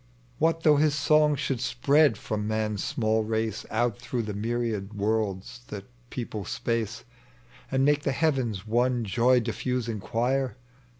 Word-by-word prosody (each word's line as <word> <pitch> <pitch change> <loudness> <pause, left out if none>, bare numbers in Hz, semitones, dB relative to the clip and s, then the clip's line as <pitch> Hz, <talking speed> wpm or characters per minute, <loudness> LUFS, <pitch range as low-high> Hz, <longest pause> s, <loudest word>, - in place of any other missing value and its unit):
35 - - -19
What 165 +1 +2
thongli 150 -2 +5
his 150 -1 +3
song 150 0 +4
should 130 -3 -2
spread 140 +5 +3
from 105 -2 -3
man's 110 -2 -1
small 110 -5 +1
race 110 0 -2
Out 120 0 0
through 120 -1 -3
the 105 -1 -4
myriad 110 -1 -2
worlds 105 +1 -1
that 100 -2 -7 0.2
people 115 -5 -5
space, 115 +1 -2 0.7
And 135 0 +2
make 145 0 +3
the 140 - 0
heavens 130 - 0
one 120 +1 +1
joy 120 +4 +3
diffusifig 115 -1 -2
choir? 125 +2 -1
120 Hz, 145 wpm, -27 LUFS, 110-135 Hz, 0.7 s, thongli